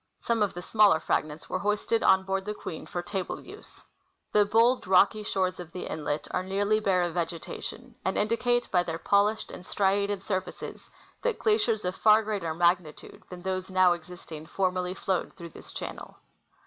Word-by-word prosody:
Some 230 -2 -1
of 205 -4 +1
the 175 - -6
smaller 210 -6 +5
fragments 155 0 -2
were 185 - -2
hoisted 210 +3 0
on 190 0 +5
board 195 0 -1
the 210 0 -3
Queen 160 - -7
for 175 - -4
table 190 +1 -4
use. - - -13 0.5
The 210 -1 +5
bold, 230 +2 +3
rocky 195 +3 +5
shores 185 -3 -1
of 175 -1 -8
the 180 - -6
inlet 150 -1 -3
are 180 - 0
nearly 200 +3 +1
bare 190 -4 +2
of 175 -1 -2
vegetation, 175 +8 -5
and 190 - -1
indicate 240 +3 +1
by 180 - +4
their 165 -2 -3
polished 205 +4 +2
and - - -9
striated 200 +1 0
surfaces 190 -3 -5 0.3
that 485 -2 0
glaciers 420 - +1
of 180 +1 -1
far 215 0 +5
greater 200 -7 -2
magnitude 170 -2 0
than 180 -1 -9
those 185 0 -2
now 185 -1 +5
existing 165 -2 -9
formerly 185 0 -1
flowed 190 -2 -2
through 170 -2 -9
this - - -13
channel. - - -7
190 Hz, 175 wpm, -28 LUFS, 175-210 Hz, 0.5 s, smaller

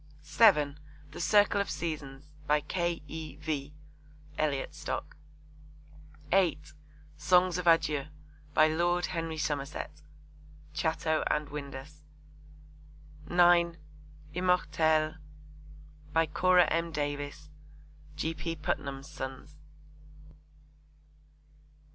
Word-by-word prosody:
(7) 145 0 +4 0.3
The - - -7
Circle 205 +3 +4
of 200 - -3
Seasons. 145 -4 -5 0.2
By 150 0 +3
K. 170 +1 -2
E. 155 -2 -7
V. 145 -3 -4 0.6
(Elliot 145 -3 -1
Stock.) 150 +1 -5 1.2
(8) 175 -6 +2 0.4
Songs 180 +3 +3
of 180 - -4
Adieu. 150 -4 +3 0.5
By 155 - +6
Lord 175 +3 +1
Henry 165 -2 -3
Somerset. 145 -1 -4 0.7
(Chatto 160 0 0
and 150 -1 0
Windus.) 145 0 -8 1.3
(9) 175 -1 +5 0.6
Immortelles. 160 -3 +2 1.0
By 165 0 +4
Cora 180 +3 +4
M. 165 +1 -1
Davis. 145 0 -4 0.6
(G. 160 +2 -2
P. 165 0 -4
Putnam's 140 -3 -3
Sons.) 135 0 -7
155 Hz, 85 wpm, -30 LUFS, 145-170 Hz, 1.3 s, By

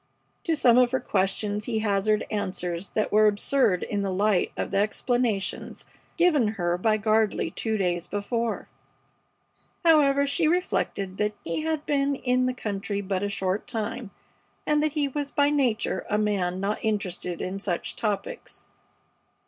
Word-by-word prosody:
To 330 - +2
some 250 -4 +5
of 250 -1 +5
her 260 +1 0
questions 205 +2 -1
he 230 -2 -1
hazarded 215 0 +1
answers 185 -3 -3
that 215 - 0
were 215 +1 +5
absurd 210 -1 +2
in 205 -1 -2
the 200 - -1
light 200 0 +2
of - - -3
the - - 0
explanations 215 -1 -1 0.3
given 320 -9 +4
her 175 -1 +1
by 215 +3 +2
Gardley 215 -5 +1
two 220 -1 -1
days 175 -3 -1
before. 230 +3 -2 1.2
However, 280 -4 +5
she 305 +3 +1
reflected 255 - -1
that 210 0 0
he 165 - -2
had 315 -1 -2
been 280 -1 +1
in 255 -1 +1
the 255 - 0
country 205 -2 -3
but 190 -1 -2
a 205 - -1
short 195 0 -1
time, 225 -1 -4 0.6
and 300 0 +2
that 305 -1 0
he 295 -2 +1
was 285 +1 -3
by 285 0 +2
nature 240 -9 0
a 210 - +2
man 195 -4 0
not 200 +2 -2
interested 185 -5 -2
in 190 +2 -4
such 180 -3 -3
topics. 220 - -4
215 Hz, 155 wpm, -26 LUFS, 195-260 Hz, 1.2 s, some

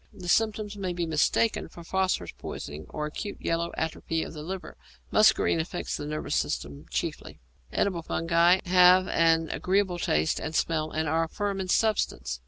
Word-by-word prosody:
The 180 -2 -10
symptoms 215 +1 +1
may 190 -3 -3
be 175 -1 -2
mistaken 160 +8 +1
for 170 - -12
phosphorus 185 - -1
poisoning 75 +2 -7
or 150 - -4
acute 200 +7 -5
yellow 170 0 -1
atrophy 160 0 -2
of - - -8
the 155 - -7
liver. 185 +4 -6 0.4
Muscarine 215 -5 +4
affects 175 +2 -3
the 145 - -5
nervous 155 0 -3
system 70 0 -3
chiefly. - - -4 0.3
Edible 185 -4 0
fungi 170 +2 +3
have 180 +1 +6
an 165 -1 +3
agreeable 190 -2 0
taste 80 - +1
and 160 0 -5
smell, 155 -1 0
and 160 0 -2
are 165 +2 +1
firm 200 +3 -3
in 185 - -4
substance. 70 - 0
170 Hz, 165 wpm, -27 LUFS, 160-190 Hz, 0.4 s, have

